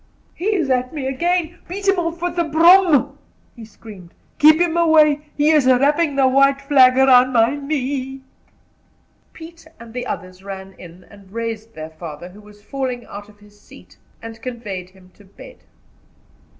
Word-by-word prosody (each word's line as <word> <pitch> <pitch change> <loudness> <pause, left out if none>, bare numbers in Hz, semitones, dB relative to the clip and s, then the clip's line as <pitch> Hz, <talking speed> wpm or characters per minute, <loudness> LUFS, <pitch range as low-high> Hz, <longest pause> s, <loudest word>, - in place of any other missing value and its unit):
"He 355 - -8
is 320 -8 -1
at 250 0 -1
me 290 -4 -6
again! 340 +5 -2
Beat 390 +3 -6
him 390 -2 +2
off 335 0 -4
with 350 -1 -3
the 345 - 0
broom!" 335 0 +3 0.4
he 235 - -12
screamed. 205 -4 -14 0.2
"Keep 310 +2 +6
him 345 -1 0
away. 305 -3 +3
He 295 +1 +3
is 300 -4 +2
wrapping 285 +4 +2
the 270 -1 +3
white 275 +1 +3
flag 270 -3 +4
round 255 -1 +4
my 230 +3 +2
knee." 270 -2 -4 1.1
Pete 330 0 -14
and 230 -1 -13
the 250 0 -5
others 185 0 -8
ran 195 -1 -9
in, 175 +1 -14
and 200 -2 -19
raised 225 0 -6
their 155 0 -8
father, 160 +1 -10
who 200 +3 -16
was 210 0 -19
falling 255 0 -5
out 205 +1 -11
of 205 0 -22
his 205 0 -21
seat, - - -18 0.3
and 225 0 -10
conveyed 210 -8 -7
him 185 -1 -22
to 205 - -21
bed. - - -15
260 Hz, 170 wpm, -19 LUFS, 210-310 Hz, 1.1 s, Keep